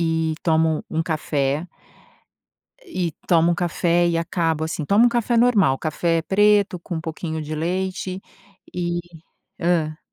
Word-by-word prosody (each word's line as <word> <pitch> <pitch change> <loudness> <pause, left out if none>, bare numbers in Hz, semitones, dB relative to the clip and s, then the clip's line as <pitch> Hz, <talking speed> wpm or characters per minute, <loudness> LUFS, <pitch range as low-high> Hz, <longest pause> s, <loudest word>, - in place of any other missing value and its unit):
e 160 -1 0
tomo 160 -1 +2
um 160 +1 -1
café 150 0 -1 1.2
E 175 -4 -3
tomo 170 -1 +4
um - - +1
café 175 0 +1
e 170 -1 +1
acabo 165 -2 -1
assim, 160 -1 -3
tomo 205 +9 +4
um - - +5
café 235 0 0
normal, 210 - +4
café 165 +1 0
preto 205 -1 +3
com 175 - -7
um - - -3
pouquinho 160 -1 -5
de 155 +1 -5
leite 185 +3 -3 0.5
e 175 -1 -2 0.6
hã. 160 -3 0
170 Hz, 140 wpm, -22 LUFS, 160-185 Hz, 1.2 s, um